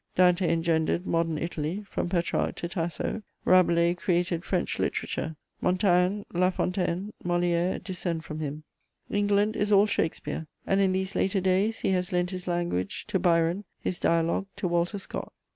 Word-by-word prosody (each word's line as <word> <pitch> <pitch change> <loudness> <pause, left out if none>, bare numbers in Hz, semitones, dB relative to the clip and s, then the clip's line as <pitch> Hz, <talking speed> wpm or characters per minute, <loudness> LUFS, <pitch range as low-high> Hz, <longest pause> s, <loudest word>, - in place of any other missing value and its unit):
Dante 180 -1 +4
engendered 165 +1 +1
Modern 165 -2 0
Italy, 170 +4 -3
from - - -2
Petrarch 175 -1 0
to 170 - -4
Tasso. 170 +4 -3 0.2
Rabelais 170 -2 +5
created 175 -1 0
French - - -1
literature: 160 0 -2 0.3
Montaigne, 180 +2 +2
La 180 +1 +3
Fontaine, 185 +2 -1
Molière 175 0 +1
descend 175 -3 -3
from 155 0 -6
him. 150 0 -4 0.5
England 205 +1 +2
is 205 0 0
all 200 0 +7
Shakespeare, 160 -4 -2 0.2
and 195 +1 +2
in 190 -1 +3
these 190 +1 -1
later 195 +1 +1
days 190 +4 +1
he - - +1
has 180 +1 0
lent 180 0 0
his 185 -1 -6
language 175 - -2
to 190 - +1
Byron, 170 +2 +2 0.2
his 180 - -3
dialogue 170 +3 +1
to 200 -2 -2
Walter 175 +3 0
Scott. 195 - -6
180 Hz, 155 wpm, -27 LUFS, 170-190 Hz, 0.5 s, all